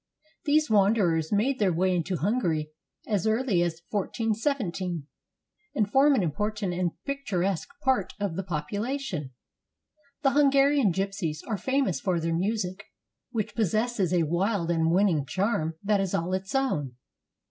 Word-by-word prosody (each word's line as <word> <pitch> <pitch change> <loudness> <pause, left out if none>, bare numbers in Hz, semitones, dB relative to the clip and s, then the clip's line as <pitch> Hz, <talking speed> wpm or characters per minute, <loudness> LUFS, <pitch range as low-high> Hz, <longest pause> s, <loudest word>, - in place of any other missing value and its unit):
These 305 +1 +3
wanderers 195 - +3
made 245 +6 +1
their 200 -4 +3
way 185 +2 +1
into 180 +2 -1
Hungary 165 - 0 0.3
as 210 0 0
early 220 -4 +2
as 175 -1 -2
141 220 +2 0 0.4
7, 175 -6 -4 0.7
and 210 -2 +1
form 280 +3 +5
an 210 - +2
important 205 +4 -2
and 175 -1 -1
picturesque 195 -10 -1
part 255 -8 +1
of 200 -5 -2
the 190 - -1
population. 190 - -3 0.9
The 270 - +4
Hungarian 275 -4 +4
gypsies 190 -4 -2
are 220 - -2
famous 260 - 0
for 175 +3 0
their 165 0 -1
music, 190 +1 -2 0.4
which 225 -5 -3
possesses 215 -2 0
a 175 -2 +3
wild 175 +2 0
and 165 -1 +2
winning 175 -4 +3
charm 165 - -1
that 205 -1 +2
is 195 -2 -1
all 175 +3 -1
its 190 +5 -3
own. 150 - 0
195 Hz, 145 wpm, -27 LUFS, 170-225 Hz, 0.9 s, form